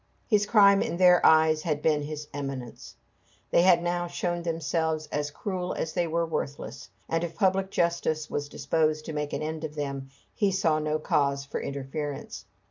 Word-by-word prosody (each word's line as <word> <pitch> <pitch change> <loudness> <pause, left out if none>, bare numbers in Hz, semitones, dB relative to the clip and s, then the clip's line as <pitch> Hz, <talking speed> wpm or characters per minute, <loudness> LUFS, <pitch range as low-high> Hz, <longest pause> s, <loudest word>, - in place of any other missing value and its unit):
His 205 -2 +2
crime 200 -2 +6
in 170 - -2
their 180 -1 +6
eyes 155 0 +5
had 150 -2 -2
been 155 -2 +3
his 150 0 -6
eminence. 135 -4 -6 0.6
They - - +5
had 175 -1 +5
now 175 0 -1
shown 175 0 -2
themselves 160 -1 -1
as 145 0 -1
cruel 180 +3 -4
as 160 - -3
they 175 -2 0
were 170 +1 0
worthless; 150 -3 -5 0.2
and 165 +1 0
if 170 -1 -4
public 190 -1 +1
justice 170 -4 0
was 145 0 -3
disposed 155 -1 0
to 160 - -5
make 150 -1 -3
an - - -3
end 160 +1 -4
of 155 -1 -5
them, 140 -2 -4 0.2
he 205 -4 +1
saw 165 -5 +2
no 155 0 0
cause 140 -2 0
for 140 - -4
interference. 140 +1 -5
160 Hz, 180 wpm, -27 LUFS, 150-175 Hz, 0.6 s, crime